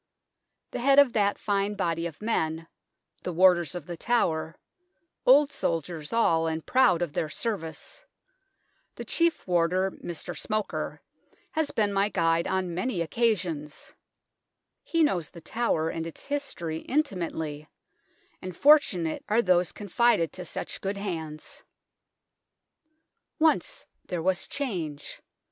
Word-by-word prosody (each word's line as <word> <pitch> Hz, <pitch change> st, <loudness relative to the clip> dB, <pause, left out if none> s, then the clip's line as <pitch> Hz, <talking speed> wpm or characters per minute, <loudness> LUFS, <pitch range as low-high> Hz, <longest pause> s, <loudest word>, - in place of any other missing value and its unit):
The -, -, -4 dB
head 275 Hz, +3 st, +4 dB
of 285 Hz, -4 st, +7 dB
that 205 Hz, -2 st, +2 dB
fine 205 Hz, 0 st, 0 dB
body 170 Hz, -3 st, -1 dB
of 165 Hz, +4 st, -11 dB
men, 165 Hz, -7 st, -1 dB, 0.6 s
the 180 Hz, -, -4 dB
Warders 175 Hz, -1 st, +4 dB
of 175 Hz, -4 st, -6 dB
the 175 Hz, -, -6 dB
Tower 160 Hz, -8 st, 0 dB, 0.7 s
old 285 Hz, +3 st, +7 dB
soldiers 165 Hz, -, -3 dB
all, 165 Hz, -8 st, +3 dB
and 160 Hz, 0 st, -3 dB
proud 250 Hz, -10 st, +4 dB
of 160 Hz, -4 st, -4 dB
their 155 Hz, -, -1 dB
service 165 Hz, -, -4 dB, 0.9 s
the -, -, -7 dB
Chief 335 Hz, -1 st, +1 dB
Warder 180 Hz, +2 st, +2 dB
(Mr. 170 Hz, -3 st, -7 dB
Smoker) 215 Hz, -1 st, -3 dB, 0.5 s
has 315 Hz, -2 st, 0 dB
been 205 Hz, -2 st, 0 dB
my 200 Hz, +1 st, +2 dB
guide 165 Hz, -3 st, +1 dB
on 185 Hz, -2 st, -1 dB
many 185 Hz, +1 st, -1 dB
occasions; 170 Hz, -6 st, -1 dB, 0.9 s
he 330 Hz, -1 st, +1 dB
knows 175 Hz, -, +1 dB
The 170 Hz, -, -12 dB
Tower 165 Hz, -3 st, 0 dB
and 165 Hz, 0 st, -4 dB
its 165 Hz, -, -10 dB
history 275 Hz, -, -3 dB
intimately, 165 Hz, -, -2 dB, 0.7 s
and 185 Hz, 0 st, -6 dB
fortu 290 Hz, -, +5 dB
nate 160 Hz, -, -3 dB
are 225 Hz, +3 st, +3 dB
those 180 Hz, -1 st, +3 dB
confided 205 Hz, -5 st, +1 dB
to 180 Hz, -, -7 dB
such -, -, -5 dB
good 195 Hz, +1 st, -2 dB
hands. 160 Hz, -6 st, -6 dB, 1.8 s
Once 315 Hz, -1 st, +1 dB, 0.2 s
there 175 Hz, -2 st, -3 dB
was 190 Hz, +1 st, +1 dB
change. 170 Hz, -, -4 dB
180 Hz, 130 wpm, -27 LUFS, 165-230 Hz, 1.8 s, of